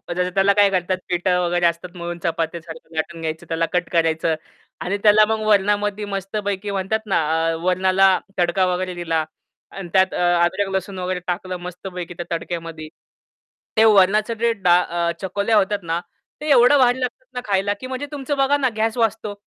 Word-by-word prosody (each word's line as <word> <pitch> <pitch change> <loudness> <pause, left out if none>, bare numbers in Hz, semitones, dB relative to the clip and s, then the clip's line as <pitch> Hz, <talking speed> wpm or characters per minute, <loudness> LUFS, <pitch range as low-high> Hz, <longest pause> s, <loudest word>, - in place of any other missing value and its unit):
जसं 180 0 0
त्याला 195 +1 +4
काय 200 -1 +6
करतात 185 0 0
पिठं 180 0 +1
वगैरे 175 0 +1
असतात 170 +2 -1
म्हणून 175 0 -5
चपात्यासारखं 165 0 -4
लाटून 165 +1 -3
घ्यायचं 160 0 -4
त्याला 165 0 0
कट 180 -1 0
करायचं 165 -1 +1 0.5
आणि 200 +3 -1
त्याला 215 0 +6
मग 220 0 -1
वरणामध्ये 205 0 +2
मस्तपैकी 200 0 -3
म्हणतात 195 +3 -1
ना, 195 -5 +1 0.3
अ, 165 - -1
वरणाला 185 +1 +3 0.3
तडका 175 +2 +2
वगैरे 185 0 -3
दिला 165 -2 -1 0.5
आणि 195 -3 -8
त्यात 190 0 +3
अ, - - -2 0.2
अदरक 195 +3 0
लसूण 190 0 -3
वगैरे 180 0 -2
टाकलं 185 +1 -3
मस्तपैकी 180 0 -7
त्या 175 0 -6
तडक्यामध्ये 165 -2 -6 0.9
ते 220 - +6
वरणाच 210 +1 +4
जे 235 0 +2
डा 180 -5 +3
अ, 170 -1 -1
चकोल्या 200 +3 0
होतात 205 0 +1
ना, 165 +1 -1 0.4
ते 305 - -3
एवढं 250 +2 +6
वाढ 245 -2 +4
लागतात 260 - -4
ना, 250 - -4
खायला 200 0 +1
की 255 - -7
म्हणजे 260 +2 -4
तुमचं 285 0 -3
बघा 275 +1 +3
ना, 270 -3 +1
गॅस 225 +2 0
वाचतो. 220 -2 0
190 Hz, 175 wpm, -21 LUFS, 175-210 Hz, 0.9 s, काय